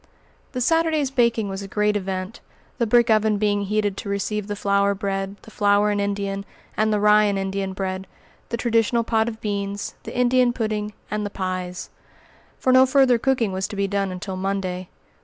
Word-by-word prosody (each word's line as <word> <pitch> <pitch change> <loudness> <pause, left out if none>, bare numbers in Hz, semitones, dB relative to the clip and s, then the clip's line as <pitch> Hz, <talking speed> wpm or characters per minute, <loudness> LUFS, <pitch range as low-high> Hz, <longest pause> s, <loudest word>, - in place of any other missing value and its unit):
The 250 - -2
Saturday's 320 -1 +2
baking 235 -5 +2
was 195 0 -5
a 200 - -6
great 210 +1 +1
event, 190 +1 -3 0.4
the 235 - +2
brick 235 +1 +4
oven 215 -1 +3
being 205 -1 +1
heated 205 -1 0
to 200 - -5
receive 200 +1 -2
the 205 - -3
flour 200 0 +2
bread, 195 -1 -3
the 220 - -13
flour 205 0 +3
and 205 0 0
Indian, 200 -1 -2 0.3
and 215 0 +2
the 210 - +2
rye 210 0 +5
and 200 -1 +1
Indian 195 0 -2
bread, 190 0 -4 0.4
the 235 - -2
traditional 230 0 +2
pot 225 0 +1
of 220 -1 -9
beans, 200 -1 -3
the - - -7
Indian 250 0 +3
pudding, 215 -3 -2 0.2
and 210 0 -1
the 205 - -3
pies; 185 -2 -4 0.7
for 255 - +2
no 260 0 +7
further 260 -3 +4
cooking 250 -5 +1
was 190 0 -2
to - - -7
be 200 0 0
done 195 -1 -1
until 185 +1 -5
Monday. 185 -1 -3
205 Hz, 190 wpm, -23 LUFS, 195-225 Hz, 0.7 s, no